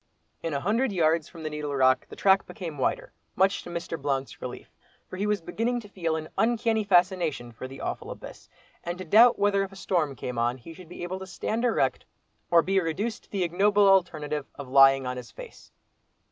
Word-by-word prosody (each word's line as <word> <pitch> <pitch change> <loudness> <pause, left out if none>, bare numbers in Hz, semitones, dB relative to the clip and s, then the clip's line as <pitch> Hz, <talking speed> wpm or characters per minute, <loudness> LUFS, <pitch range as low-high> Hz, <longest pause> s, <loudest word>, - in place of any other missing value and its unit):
In 165 - -3
a - - 0
hundred 225 - +1
yards 165 -3 +1
from 165 -3 -11
the 155 - -2
Needle 150 -1 -4
Rock 130 -1 +3
the - - -10
track 195 0 +3
became 165 -6 -7
wider, - - -1 0.2
much 195 +1 +2
to - - -10
Mr. 170 -2 -5
Blount's 135 -1 -2
relief, 125 -1 -8 0.4
for - - -8
he 200 +3 -2
was 210 -2 0
beginning 230 +8 -2
to 210 - -13
feel 170 -5 -2
an 155 -1 -4
uncanny 225 -1 +2
fascination 175 -9 +1
for 120 +3 -8
the 135 +1 -10
awful - - -4
abyss, - - -10 0.3
and 175 +1 -4
to 185 - -7
doubt 225 +8 +6
whether 200 -1 +2
if 195 - -6
a - - -13
storm 170 -7 -1
came 125 -1 -5
on, 120 +2 0
he 130 +7 -11
should 175 0 -14
be 175 - -8
able 185 +2 -4
to 190 - -8
stand 215 +6 -3
erect, 235 - +1 0.4
or 170 -1 +5
be 195 0 +2
reduced 190 +7 -3
to - - -31
the 195 -3 -1
ignoble 200 +4 +3
alternative 155 -6 +1
of 140 - -8
lying 135 0 +6
on 125 0 -3
his 120 -2 -8
face. - - -12
175 Hz, 215 wpm, -27 LUFS, 145-195 Hz, 0.4 s, doubt